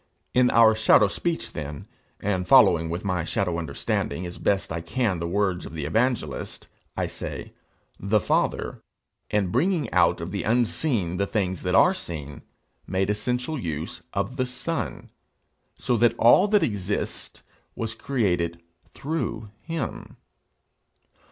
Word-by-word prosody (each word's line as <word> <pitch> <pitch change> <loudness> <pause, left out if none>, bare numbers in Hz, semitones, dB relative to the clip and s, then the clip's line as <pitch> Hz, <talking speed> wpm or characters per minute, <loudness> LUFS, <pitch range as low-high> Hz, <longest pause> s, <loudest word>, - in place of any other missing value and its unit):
In 125 0 +4
our 115 -1 +6
shadow 110 -1 +5
speech 170 - -3
then, 75 -2 -6 0.3
and 95 -3 -1
following 80 -2 +6
with 85 +4 -4
my 90 -3 0
shadow 85 0 -1
understanding 80 +1 -2
as 90 0 -8
best 100 -4 0
I 85 0 -3
can 105 -2 -1
the 85 - -2
words 95 -1 0
of - - -9
the 80 -3 -4
evangelist, 110 - -1 0.3
I - - +1
say, - - -6 0.5
The 105 +2 +2
Father, - - 0 0.5
in 100 -4 +1
bringing 160 - +1
out - - +4
of - - -5
the - - -2
unseen 115 - 0
the 100 +1 0
things 95 -5 -1
that 90 0 0
are 180 - +6
seen, 75 - -7 0.5
made 95 +2 0
essential 125 +7 -2
use 85 -2 -4
of 100 +6 -2
the 130 -1 0
Son, 125 - -4 0.7
so 125 - 0
that 120 +1 +3
all 120 - +6
that 210 -1 +3
exists 105 -1 -3 0.3
was 115 -1 -3
created 90 -10 -1 0.4
through 115 -8 -3
him. 165 0 -5
100 Hz, 140 wpm, -25 LUFS, 85-125 Hz, 0.7 s, our